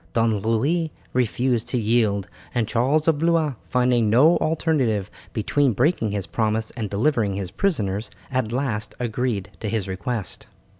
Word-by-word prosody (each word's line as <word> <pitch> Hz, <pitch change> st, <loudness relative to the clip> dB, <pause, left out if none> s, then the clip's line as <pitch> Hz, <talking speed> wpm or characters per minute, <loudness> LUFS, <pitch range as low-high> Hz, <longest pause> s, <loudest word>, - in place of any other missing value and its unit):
Don 115 Hz, -2 st, +2 dB
Louis 140 Hz, -, +1 dB, 0.2 s
refused 125 Hz, -1 st, 0 dB
to 125 Hz, -, 0 dB
yield, 110 Hz, -3 st, +1 dB, 0.3 s
and 115 Hz, -3 st, +1 dB
Charles 135 Hz, +8 st, +1 dB
of 160 Hz, -3 st, +3 dB
Blois, 165 Hz, -3 st, +2 dB, 0.2 s
finding 125 Hz, -3 st, +3 dB
no 140 Hz, +10 st, +6 dB
alternative 145 Hz, -, 0 dB, 0.2 s
between 130 Hz, +4 st, +1 dB
breaking 125 Hz, -, +1 dB
his 100 Hz, -2 st, -2 dB
promise 110 Hz, 0 st, -1 dB
and 110 Hz, -4 st, -4 dB
delivering 105 Hz, -2 st, +1 dB
his 95 Hz, -2 st, -4 dB
prisoners, 105 Hz, -, -1 dB, 0.2 s
at 130 Hz, -4 st, 0 dB
last 120 Hz, -4 st, -2 dB
agreed 120 Hz, -3 st, -2 dB
to 110 Hz, -, -3 dB
his 105 Hz, -3 st, -1 dB
request. 100 Hz, +3 st, -4 dB
115 Hz, 145 wpm, -23 LUFS, 105-135 Hz, 0.3 s, no